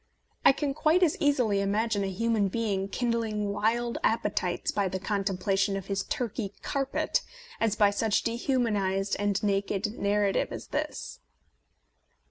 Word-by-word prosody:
I - - +8
can 275 0 -2
quite 310 +5 +3
as 320 - +3
easily 245 -9 +2
imagine 205 +1 0
a 195 - -1
human 215 +1 +1
being 195 -2 -1
kindling 220 -2 -1
wild 235 +3 0
appe 220 -2 +1
tites 180 -1 -1
by 200 -2 0
the 190 - -2
contemplation 195 0 0
of 195 - -6
his 195 0 -1
Turkey 220 -4 -3
carpet 275 -1 0 0.4
as 220 -2 +1
by 205 -1 +4
such 210 +1 +1
dehumanized 215 -6 0
and 205 -1 +1
naked 200 +2 -1
narrative 200 0 +1
as - - -7
this. - - -4
210 Hz, 140 wpm, -28 LUFS, 195-230 Hz, 0.4 s, I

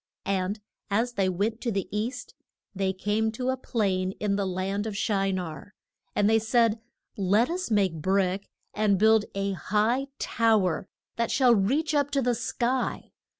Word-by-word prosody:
And 195 +2 -1 0.3
as 230 +4 0
they 195 -4 +1
went 210 +6 -1
to 240 - -1
the 195 -3 -2
east 245 +4 -3 0.4
they 190 -1 0
came 210 +3 0
to 250 +3 -2
a - - 0
plain 190 -7 -1
in 205 -1 -1
the 200 -1 -1
land 195 +3 -2
of 205 -2 -4
Shi 195 -2 +1
nar. 180 0 -5 0.4
And 205 - +3
they 225 +1 +4
said, 225 0 +2 0.4
Let 205 - +2
us 365 +1 -3
make 200 -5 +2
brick 190 +2 0 0.2
and 210 -2 +2
build 220 +1 +4
a 195 0 -1
high 215 +7 0
tow 225 -4 +2
er 180 +1 -2 0.3
that 235 -1 0
shall 255 -3 +4
reach 270 +10 +1
up 285 -1 +2
to - - +3
the 245 0 +2
sky. 245 +2 -2
210 Hz, 170 wpm, -27 LUFS, 195-235 Hz, 0.4 s, they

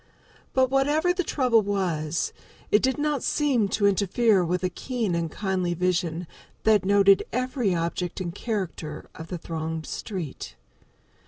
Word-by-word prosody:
But 260 -1 +3
whatever 295 +6 +3
the 365 0 -1
trouble 250 -7 +3
was, 175 -6 -1 0.4
it 210 - +5
did 260 0 +1
not 295 -2 0
seem 270 -8 +2
to 200 +1 0
interfere 200 +1 +3
with 180 +1 -1
a 185 - +2
keen 230 -1 -2
and 170 -1 -1
kindly 185 -3 -1
vision 175 -1 0 0.4
that 215 -3 +4
noted 200 0 +5
every 250 -5 0
object 170 +1 -2
and 175 -2 -4
character 180 -9 -4
of 160 - -9
the 180 - -4
thronged 160 -1 -4
street. 155 - -6
195 Hz, 145 wpm, -26 LUFS, 170-240 Hz, 0.4 s, it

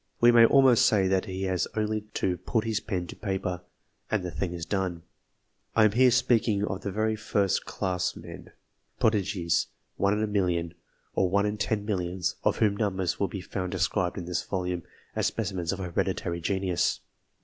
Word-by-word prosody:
We 120 0 +7
may 115 -1 +8
almost 135 -3 +6
say 95 -3 +3
that 95 -1 +1
he 95 0 -4
has 95 -1 0
only 110 0 0
to 90 - +1
put 110 +3 -1
his 110 -2 -1
m 90 -4 -1
to - - -9
paper, 95 -3 -3 0.5
and 110 -4 0
the 90 - -4
thing 85 +4 -3
is 85 -2 -5
done. 90 -4 -2 0.7
I 110 - +6
am 105 - +4
here 125 +4 +5
speaking 115 -4 +2
of 95 -2 -4
the - - -3
very 110 +2 0
first 105 -3 0
class 90 -2 -2
men - - -10 0.5
prodigies 95 -6 +1 0.3
one 100 +1 +2
in 105 - 0
a - - +3
million, 90 -5 0 0.4
or 95 - +2
one 100 +2 +2
in 105 0 -1
ten 105 -1 -1
millions, 90 -3 -1
of - - +2
whom 105 -2 +2
numbers 95 -4 -1
will 100 - +2
be 95 +1 -6
found 90 0 -4
described 90 +1 0
this 90 0 -1
volume, 90 -2 -3 0.3
as - - +1
specimens 95 -6 -2
of 100 - -3
hereditary 85 -1 -2
genius. 90 -1 0
95 Hz, 180 wpm, -27 LUFS, 90-105 Hz, 0.7 s, may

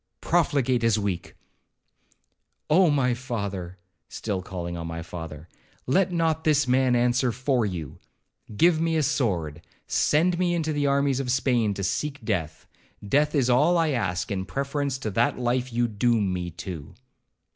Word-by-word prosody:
'Profligate 140 -8 +1
as 115 -2 +3
weak.' 100 -4 -3 1.4
'Oh! 180 +2 +5
my 135 -4 +2
father,' 100 -8 -5 0.3
still 100 -4 -3
calling 90 -2 -5
on 85 -1 -5
my 85 0 -5
father, 80 -2 -8 0.4
'let 185 +8 +2
not 160 -2 0
this 150 -3 +3
man 130 0 +3
answer 125 +1 +2
for 125 -1 0
you. 85 -7 -6 0.6
Give 165 +2 +4
me 165 -1 +1
a 155 - +2
sword,—send 130 - 0
me 175 -1 +1
into 160 -2 -1
the 145 -1 0
armies 140 -1 +2
of 135 -2 -3
Spain 120 -5 +1
to 100 - -4
seek 140 +6 -2
death,—death 105 - -2
is 135 -4 +2
all 150 +8 +4
I 165 -2 +2
ask, 95 -9 -1
in 95 -1 -2
preference 140 0 -2
to 110 -5 -4
that 115 +5 +1
life 125 +1 -1
you 120 +1 +1
doom 110 -3 +1
me 90 -1 -3
to.' 85 -3 -8
125 Hz, 150 wpm, -25 LUFS, 95-145 Hz, 1.4 s, Oh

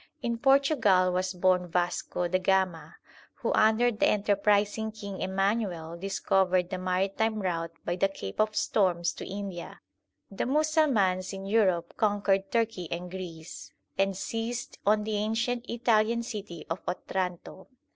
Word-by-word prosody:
In 235 -1 -1
Portugal 255 -9 +4
was 185 0 0
born 180 0 +2
Vasco 175 0 -1
da 185 +2 +1
Gama, 185 - 0 0.4
who - - -2
under 220 +3 +4
the 215 - +2
enter 205 0 +2
prising 210 +2 +1
King 200 -3 -7
Emanuel 190 -4 -1
discovered 185 0 +1
the 185 - -3
maritime 195 +4 0
route 165 -4 -2
by 175 +1 -1
the 195 - +3
Cape 100 - -8
of 215 0 0
Storms 175 -4 +1
to - - -8
India. 195 -3 -6 0.5
The 195 - -2
Musalmans 260 - +2
in 195 0 -6
Europe 190 -5 +2
conquered 200 -2 +1
Turkey 225 -7 -1
and 175 +1 -4
Greece, 175 -3 -8 0.2
and 195 -1 +1
seized 230 +4 -4
on 210 0 +4
the 215 0 -2
ancient 235 +3 -1
Italian 235 -1 +2
city 205 -8 -7
of 165 +3 -3
Otranto. 180 0 -4
195 Hz, 140 wpm, -28 LUFS, 180-220 Hz, 0.5 s, Portugal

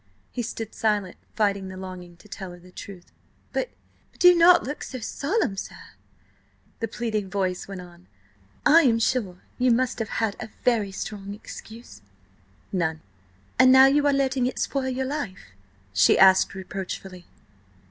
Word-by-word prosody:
He 245 - -3
stood 225 -1 -5
silent, 205 -4 -1 0.2
fighting 200 -3 0
the 185 0 -8
longing 180 -2 -9
to 210 - -18
tell 190 -2 -7
her 175 - -13
the 180 +1 -17
truth. 185 -1 -11 0.4
"But–but–do 360 -6 +1
not 345 +1 +6
look 290 +4 -5
so 260 - -6
solemn, 280 - -1
sir," 195 - -7 1.0
the 225 - -2
pleading 215 -3 -3
voice 185 -2 -2
went 195 -2 -7
on. 175 0 -15 0.6
"I 315 +3 +7
am 240 -7 +3
sure 220 -6 -1 0.2
you 250 0 +3
must 245 +1 +1
have 220 -2 -3
had 220 -3 0
a 220 - -6
very 220 -5 +2
strong 200 0 -6
excuse?" 220 - -11 0.7
"None." 160 -4 -1 0.6
"And 255 - +7
now 265 0 +9
you 290 +2 +4
are - - +4
letting 265 -2 +1
it 255 - -4
spoil 270 -2 -1
your 260 +1 -2
life?" 245 - -5 0.4
she 95 0 +5
asked 190 0 +5
reproachfully. 190 -1 -7
215 Hz, 155 wpm, -25 LUFS, 190-255 Hz, 1.0 s, now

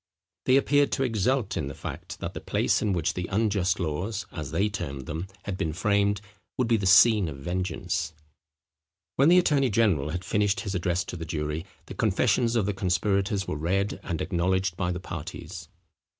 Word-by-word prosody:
They 130 - +5
appeared 145 +1 +3
to 135 - +1
exult 120 -1 0
in 75 - -2
the 70 - -6
fact, - - -7
that - - -4
the - - -6
place - - +1
in 105 - +1
which 85 -4 0
the 90 -1 -4
unjust 100 -4 +1
laws, 95 +6 -2
as 75 -5 -5
they 100 - +1
termed 75 -10 -5
them, 80 +6 -4 0.2
had 100 -2 -4
been 80 - -1
framed, 100 +2 +1 0.4
would 125 - +1
be 115 - +4
the 100 -3 0
scene 100 0 +6
of 70 - -7
vengeance. 85 +2 -2 1.1
When 140 +4 +5
the 180 - +7
attorney 145 -7 +3
general 100 -10 +2
had 90 +4 -4
finished 105 0 +1
his 100 -4 -4
address 90 0 0
to - - -7
the 80 - -5
jury, 75 +1 -3 0.2
the - - -8
confessions 120 -1 +2
of 110 -4 +2
the 105 - 0
conspirators 95 +1 0
were - - -2
read, 95 +6 -1
and 80 - -3
acknowledged 95 0 0
by 90 0 -1
the 90 - -3
parties. 85 0 -7
95 Hz, 190 wpm, -27 LUFS, 85-105 Hz, 1.1 s, the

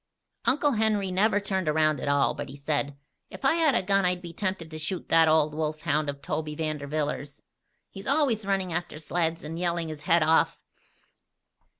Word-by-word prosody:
Uncle 290 +2 +3
Henry 215 -4 +1
never 205 +3 +3
turned 190 -4 -1
around 155 -2 +2
at - - -4
all; 140 0 +3
but - - -6
he 135 - -9
said: 145 0 -2 0.3
"If - - -8
I 270 - +5
had 320 -5 +3
a - - +2
gun 195 +1 +2
I'd 180 0 +1
be 170 -1 -8
tempted 185 -3 -3
to 155 - -6
shoot 170 +4 -4
that 165 0 +5
old 155 -1 +3
wolf 155 0 -2
hound 155 -2 0
of 140 0 -6
Toby 150 0 -3
Vanderwiller's. 150 -2 -3 0.5
He's 195 0 -9
always 270 -6 +2
running 190 -3 -1
after 175 -2 -3
sleds 165 +1 -1
and 160 +2 -5
yelling 170 -2 -1
his 155 -1 -7
head 170 +1 +3
off." 160 +1 +3
165 Hz, 190 wpm, -27 LUFS, 155-195 Hz, 0.5 s, I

